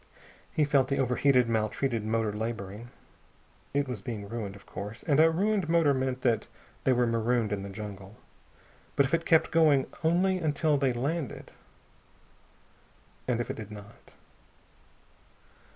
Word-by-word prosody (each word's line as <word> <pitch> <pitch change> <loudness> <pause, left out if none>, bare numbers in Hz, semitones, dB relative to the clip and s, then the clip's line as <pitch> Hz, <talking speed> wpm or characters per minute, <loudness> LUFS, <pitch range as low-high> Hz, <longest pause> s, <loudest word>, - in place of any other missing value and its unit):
He 155 - +1
felt 140 -2 +3
the 140 - -1
over 125 -2 +1
heated, 125 -3 +4
maltreated 115 +1 0
motor 110 -1 0
laboring. 110 0 -5 0.8
It 140 0 0
was 125 -6 -5
being 105 -2 -5
ruined, 105 -3 -5
of 100 - -15
course 105 +3 -7
and 145 -2 +2
a 160 +1 +7
ruined 195 +1 0
motor 165 -4 +4
meant 130 -1 -1
that 115 -3 +1 0.4
they 130 - +4
were 125 -1 +3
marooned 115 -1 +1
in 100 - -3
the 100 - -6
jungle. 100 0 -8 0.8
But 140 - +4
if 135 - -5
it 165 0 +1
kept 160 -1 +4
going 150 -5 +4 0.2
only 185 +3 +2
until 155 -1 +1
they 135 -2 +2
landed. 140 +4 -3 1.8
And 120 -2 +1
if 120 - -2
it - - -6
did 110 -2 -7
not.... 105 -1 -13
125 Hz, 150 wpm, -29 LUFS, 110-145 Hz, 1.8 s, a